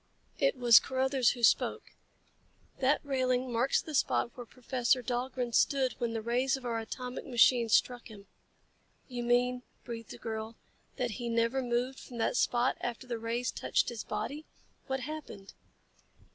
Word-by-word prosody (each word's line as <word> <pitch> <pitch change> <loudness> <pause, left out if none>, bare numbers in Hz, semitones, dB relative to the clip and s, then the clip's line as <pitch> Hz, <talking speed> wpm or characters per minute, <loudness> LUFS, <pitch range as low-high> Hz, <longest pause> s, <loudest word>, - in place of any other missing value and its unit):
It 275 -1 +2
was 240 -2 +8
Carruthers 260 -1 +1
who 240 - -9
spoke. 220 - +2 0.9
"That 270 +3 +2
railing 255 -2 0
marks 240 +4 +2
the 310 - -8
spot 250 -3 +1
where 245 -2 -9
Professor 250 0 0
Dahlgren 245 0 -2
stood 265 0 +2
when 235 -1 -1
the 225 -1 -3
rays 250 +4 +1
of 260 - -11
our 230 -1 -1
atomic 250 +3 -6
machine 240 -1 +4
struck 245 +2 +2
him." 205 -3 -13 0.8
"You 245 -2 -5
mean," 245 +1 +2 0.2
breathed 230 -2 -7
the - - -8
girl, 220 0 -5 0.4
"that 245 -2 -2
he 235 - -3
never 230 +3 +1
moved 250 +2 -1
from 245 - -10
that 225 - 0
spot 245 +1 +2
after 240 +1 -4
the 240 -2 -4
rays 235 +2 -2
touched - - 0
his 235 -3 -6
body? 300 +3 -5 0.4
What 265 -1 -2
happened?" 290 -9 -8
245 Hz, 160 wpm, -31 LUFS, 235-260 Hz, 0.9 s, was